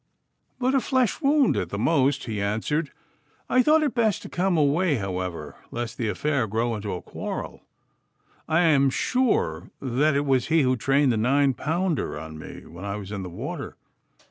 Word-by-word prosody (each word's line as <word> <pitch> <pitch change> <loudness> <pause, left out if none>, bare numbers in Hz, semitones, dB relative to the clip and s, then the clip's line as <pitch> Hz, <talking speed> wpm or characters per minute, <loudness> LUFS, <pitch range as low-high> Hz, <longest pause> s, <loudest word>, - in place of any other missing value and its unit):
'But 255 +1 +1
a 270 - +4
flesh 255 -3 0
wound, 280 -1 +3
at - - -2
the 100 - -4
most,' 140 +3 +2
he 110 -3 -3
answered. 110 - -1 0.6
'I 255 - +5
thought 310 +4 +4
it 285 -6 0
best 225 -5 +1
to - - -8
come 180 -1 +1
away, 150 +2 +3
however, 90 - -4
lest 120 -1 -4
the 115 - 0
affair 130 +4 0
grow 115 +3 0
into 105 -2 -4
a 90 - -7
quarrel. - - -6 0.9
I 160 +2 +3
am 145 -5 +4
sure 250 - 0
that 140 +3 +1
it 140 +1 +1
was 130 -3 +2
he 160 -2 +3
who 130 0 +2
trained 135 +3 +2
the 115 - 0
nine 135 +4 +3
pounder 165 - -1
on 80 0 -8
me - - -10
when 85 +3 -11
I 100 0 -3
was 100 -1 -7
in 100 -2 -4
the 90 - -6
water. 85 - -6
135 Hz, 185 wpm, -25 LUFS, 105-165 Hz, 0.9 s, I